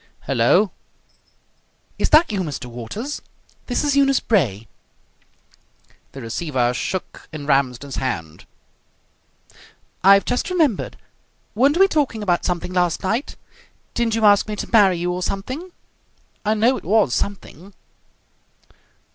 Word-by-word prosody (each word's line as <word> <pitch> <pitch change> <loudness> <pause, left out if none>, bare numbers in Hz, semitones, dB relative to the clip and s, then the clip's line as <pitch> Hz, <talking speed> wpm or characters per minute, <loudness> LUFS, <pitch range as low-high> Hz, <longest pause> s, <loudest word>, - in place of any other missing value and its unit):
"Hello!" 175 - +2 1.3
"Is - - +1
that 310 -3 +5
you, 200 -3 -1
Mr. 150 -6 -5
Waters? 125 - -6 0.5
This 245 - -1
is 290 -1 +1
Eunice 275 -1 +4
Bray." 115 - 0 1.5
The 135 - -8
receiver 125 0 -1
shook 185 +8 -5
in 155 -2 -7
Ramsden's 135 -1 0
hand. 85 -12 -4 1.6
"I've 195 +1 +6
just 245 - -1
remembered. 320 - 0 0.6
Weren't 275 +8 +3
we 390 +1 +6
talking 280 - -1
about 175 -3 0
something 180 0 -2
last 175 -2 0
night? 225 +8 -2 0.6
Didn't 235 -2 0
you 225 -1 +1
ask 205 0 +5
me 210 - -4
to - - -6
marry 195 -5 +5
you 175 +1 -1
or 180 +1 -3
something? 255 - -4 0.7
I 215 +1 +1
know 235 +5 +3
it - - -10
was 205 - +2
something." 195 0 -5
195 Hz, 125 wpm, -21 LUFS, 145-235 Hz, 1.6 s, I've